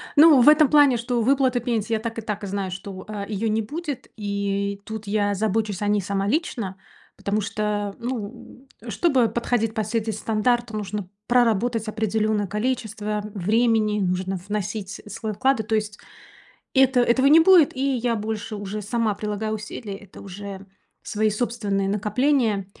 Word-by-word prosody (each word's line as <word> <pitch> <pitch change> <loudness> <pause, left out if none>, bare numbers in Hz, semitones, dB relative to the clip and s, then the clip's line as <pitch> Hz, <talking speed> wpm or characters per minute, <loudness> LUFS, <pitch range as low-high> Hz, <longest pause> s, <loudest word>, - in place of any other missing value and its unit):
Ну, 295 -3 +8
в 295 - +8
этом 305 -1 +6
плане, 290 -5 +5
что 235 0 -1
выплаты 260 0 +2
пенсии, 230 -2 -1
я 220 - +1
так 230 0 -5
и - - -4
так 210 -1 -4
знаю, 195 -1 -3
что, 190 0 -7
а, 205 -2 -5
её 215 +1 -2
не 220 +1 +1
будет, 295 +4 -5
и 200 -1 -2
тут 220 -1 -7
я 205 -1 +1
забочусь 215 -1 -1
о 205 - 0
ней 205 -1 +2
сама 195 +1 -2
лично, 225 - -2 0.4
потому 210 +1 -1
что, 205 0 -2
ну, 245 +2 -6 0.2
чтобы 250 - +2
подходить 230 -2 0
под 220 -2 -1
все 230 +1 -1
эти 220 0 -3
стандарты, 225 +2 0
нужно 205 -2 -4 0.2
проработать 235 -1 +2
определённое 215 -1 0
количество 215 -1 -2
времени, 215 +1 +2
нужно 185 0 -1
вносить 205 0 -4
свой 215 +1 -4
вклад, 265 +2 +2
и, - - -1
то 220 +1 -1
есть 210 -1 -2 0.8
Это 265 -1 +5
этого 245 +3 +3
не 305 +3 +8
будет, 330 -6 +6
и - - -4 0.2
я 235 0 0
больше 215 0 -4
уже 205 +1 -5
сама 220 +1 0
прилагаю 210 +1 -3
усилия. 210 -1 -6
Это 200 -3 -14
уже 200 0 -8 0.4
свои 215 0 0
собственные 210 -3 -1
накопления. 210 0 +1
215 Hz, 165 wpm, -23 LUFS, 205-240 Hz, 0.8 s, Ну